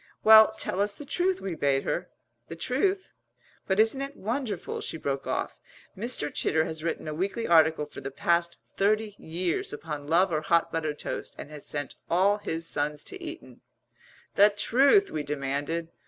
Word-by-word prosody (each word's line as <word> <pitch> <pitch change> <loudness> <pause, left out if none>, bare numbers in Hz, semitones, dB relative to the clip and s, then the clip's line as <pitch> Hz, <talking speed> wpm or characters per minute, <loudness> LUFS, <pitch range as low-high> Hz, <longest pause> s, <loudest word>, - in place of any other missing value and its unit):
"Well, 220 0 +8
tell 190 - -1
us 205 0 0
the 290 - -10
truth," 365 +6 0
we 190 - -3
bade 140 -3 +1
her. - - -2 0.4
"The 165 - -7
truth? 375 - -1 0.6
But 190 +1 +1
isn't 225 +5 +3
it 275 +1 -6
wonderful," 220 -3 -3
she - - -4
broke 140 -3 -3
off - - -3 0.4
"Mr. 210 -8 -1
Chitter 160 0 +1
has 160 -1 -6
written 165 -1 -3
a 155 - -3
weekly 195 +8 -2
article 160 -2 +4
for 150 - -10
the 135 - -5
past 170 +4 0 0.2
thirty 215 +1 +1
years 170 +1 -2
upon 145 -1 -6
love 175 +4 +3
or 155 -1 0
hot 170 +1 +2
buttered 155 -2 -2
toast - - -5
and 145 - -9
has 150 -2 -5
sent 145 -1 -3 0.2
all 195 +4 +3
his 165 -4 -2
sons 150 +1 -1
to 385 -1 -8
Eton 335 +1 -9 0.4
" - - -28
"The 205 +1 +8
truth!" 270 - +3
we 155 - -2
demanded. 145 +3 -3
170 Hz, 180 wpm, -27 LUFS, 155-220 Hz, 0.6 s, Well